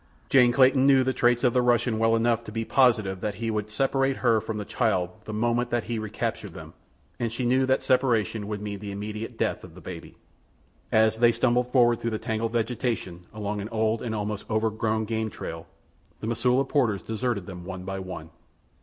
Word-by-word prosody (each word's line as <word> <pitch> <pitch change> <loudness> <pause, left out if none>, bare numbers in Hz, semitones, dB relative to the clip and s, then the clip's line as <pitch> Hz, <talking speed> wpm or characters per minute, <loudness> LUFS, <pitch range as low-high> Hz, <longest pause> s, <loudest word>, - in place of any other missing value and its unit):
Jane 125 -3 +6
Clayton 130 +1 +5
knew 135 -2 +6
the 130 0 0
traits 120 0 +2
of 125 -2 +3
the 125 - +3
Russian 120 -2 +2
well 115 0 +3
enough 115 0 +1
to - - -8
be 115 +1 -3
positive 110 -9 +2
that 105 -1 -2
he 115 +2 -2
would 105 -1 -2
separate 135 +4 +1
her 115 -3 +2
from 110 0 -4
the 105 - -4
child 95 -7 0
the - - -6
moment 120 +3 0
that 120 -1 0
he 115 -2 -3
recaptured 110 -1 -4
them, - - -10 0.5
and 115 -2 -1
she 120 +2 -3
knew 130 +2 +3
that 130 0 +2
separation 115 -5 +1
would 105 -1 -4
mean 100 -1 -5
the 100 0 -6
immediate 105 +3 -6
death 110 -2 -1
of 85 -3 -12
the - - -11
baby. 85 -1 -9 0.8
As 110 0 +4
they 120 0 +5
stumbled 125 +1 +1
forward 120 -3 +4
through 115 - -2
the 110 - -2
tangled 110 0 -2
vegetation 115 -7 -2
along 105 -1 -4
an 105 - -6
old 110 0 0
and 115 -2 -3
almost 105 -1 -4
overgrown 110 0 0
game 110 0 -2
trail 80 -5 -7 0.5
the - - -6
Mosula 125 +4 +1
porters 120 -10 +1
deserted 110 -3 -2
them 90 -2 -8
one 90 0 -7
by 95 +1 -4
one. 90 -4 -8
110 Hz, 205 wpm, -26 LUFS, 105-120 Hz, 0.8 s, Jane